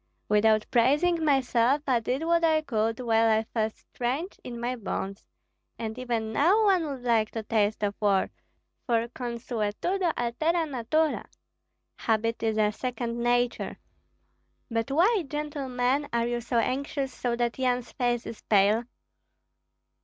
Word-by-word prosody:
"Without 215 Hz, +1 st, +4 dB
praising 295 Hz, +8 st, +3 dB
myself, 270 Hz, -1 st, +2 dB
I 255 Hz, -3 st, +2 dB
did 255 Hz, +6 st, -2 dB
what 335 Hz, 0 st, +2 dB
I 315 Hz, -1 st, +3 dB
could, 225 Hz, -4 st, -1 dB
while 225 Hz, -1 st, +3 dB
I 220 Hz, 0 st, +3 dB
felt 220 Hz, -1 st, -2 dB
strength 270 Hz, +10 st, -4 dB
in 240 Hz, -1 st, -7 dB
my 245 Hz, +2 st, -2 dB
bones. 195 Hz, -3 st, -4 dB, 0.5 s
And 220 Hz, -1 st, -4 dB
even 230 Hz, -3 st, -2 dB
now 370 Hz, -, +4 dB
one 370 Hz, -5 st, +3 dB
would 270 Hz, -4 st, -6 dB
like 225 Hz, -3 st, +2 dB
to 225 Hz, -, -3 dB
taste 215 Hz, -1 st, 0 dB
of 205 Hz, -1 st, +1 dB
war, 200 Hz, -2 st, +2 dB, 0.6 s
for 230 Hz, -1 st, +1 dB
consuetudo 240 Hz, -, -2 dB
altera 315 Hz, +8 st, 0 dB
natura 295 Hz, +3 st, 0 dB, 0.7 s
(habit 225 Hz, +1 st, 0 dB
is 220 Hz, -1 st, 0 dB
a 210 Hz, -1 st, +3 dB
second 235 Hz, 0 st, -4 dB
nature). 245 Hz, 0 st, 0 dB, 0.9 s
But 230 Hz, +3 st, -1 dB
why, 365 Hz, +8 st, +3 dB
gentlemen, 280 Hz, -2 st, -1 dB
are 235 Hz, 0 st, +1 dB
you 240 Hz, 0 st, -1 dB
so 240 Hz, +1 st, -2 dB
anxious, 270 Hz, +2 st, -1 dB
so 240 Hz, -1 st, -1 dB
that 240 Hz, +1 st, -1 dB
Yan's 250 Hz, -1 st, 0 dB
face 240 Hz, -1 st, -1 dB
is 225 Hz, -, -8 dB
pale?" 210 Hz, +3 st, +3 dB
240 Hz, 140 wpm, -27 LUFS, 225-280 Hz, 0.9 s, Without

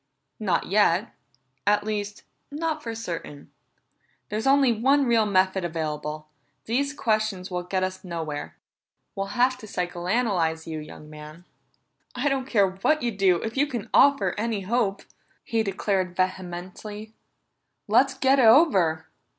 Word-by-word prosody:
"Not 190 Hz, -6 st, 0 dB
yet 200 Hz, 0 st, +2 dB, 0.5 s
at 210 Hz, 0 st, +3 dB
least, 210 Hz, -1 st, -4 dB, 0.3 s
not 315 Hz, +1 st, -3 dB
for 230 Hz, -3 st, -5 dB
certain. 170 Hz, -9 st, -7 dB, 0.8 s
There's 215 Hz, +4 st, -2 dB
only 275 Hz, -2 st, +5 dB
one 270 Hz, +5 st, +3 dB
real 230 Hz, -3 st, +3 dB
method 190 Hz, -1 st, +2 dB
available; 155 Hz, -2 st, -4 dB, 0.4 s
these 275 Hz, +5 st, 0 dB
questions 215 Hz, -8 st, -1 dB
will 180 Hz, 0 st, -2 dB
get 185 Hz, +1 st, -2 dB
us 185 Hz, 0 st, -4 dB
nowhere. 160 Hz, -5 st, -5 dB, 0.6 s
We'll 195 Hz, +2 st, -5 dB
have 255 Hz, +1 st, +3 dB
to 215 Hz, -, -10 dB
psychoanalyze 175 Hz, -2 st, -1 dB
you, 160 Hz, -1 st, -5 dB
young 150 Hz, 0 st, -11 dB
man." 155 Hz, +3 st, -12 dB, 0.7 s
"I 260 Hz, +4 st, +1 dB
don't 265 Hz, -1 st, -1 dB
care 205 Hz, -7 st, +3 dB
what 270 Hz, +11 st, 0 dB
you 240 Hz, -, 0 dB
do, 190 Hz, -4 st, +2 dB
if 225 Hz, -, -4 dB
you 285 Hz, +2 st, +2 dB
can 240 Hz, -7 st, -6 dB
offer 270 Hz, -10 st, +4 dB
any 220 Hz, -2 st, -1 dB
hope!" 200 Hz, -1 st, -1 dB, 0.4 s
he 225 Hz, -1 st, 0 dB
declared 195 Hz, -3 st, -1 dB
vehemently. 185 Hz, +4 st, -4 dB, 0.7 s
"Let's 255 Hz, +5 st, +3 dB
get 270 Hz, +1 st, +3 dB
it 250 Hz, -, +5 dB
over!" 195 Hz, -, +5 dB
205 Hz, 140 wpm, -25 LUFS, 180-235 Hz, 0.8 s, only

